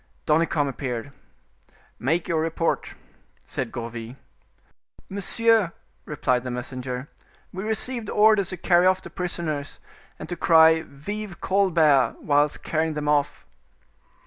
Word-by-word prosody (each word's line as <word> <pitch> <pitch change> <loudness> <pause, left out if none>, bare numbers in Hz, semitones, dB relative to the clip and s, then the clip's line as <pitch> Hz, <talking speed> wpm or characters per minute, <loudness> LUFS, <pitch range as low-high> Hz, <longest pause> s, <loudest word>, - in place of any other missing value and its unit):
Danicamp 155 -1 +2
appeared. 130 -1 -4 0.9
"Make 165 +7 0
your 160 -2 +1
report," 165 +1 -1 0.5
said - - -4
Gourville. 115 0 -6 0.9
"Monsieur," 205 0 +2 0.3
replied 130 -4 0
the 130 - -4
messenger, 125 +1 -5 0.5
"we 190 +1 -5
received 220 +1 -2
orders 210 -3 +4
to 185 - -3
carry 175 +1 +4
off 185 0 +2
the - - -10
prisoners, 165 -6 -4 0.4
and - - -8
to 175 - -4
cry 160 -1 +5
'Vive 190 +7 -7
Colbert!' 165 -8 +3
whilst 145 0 +1
carrying 160 0 -1
them 150 -1 -3
off." 145 0 0
160 Hz, 120 wpm, -24 LUFS, 140-185 Hz, 0.9 s, cry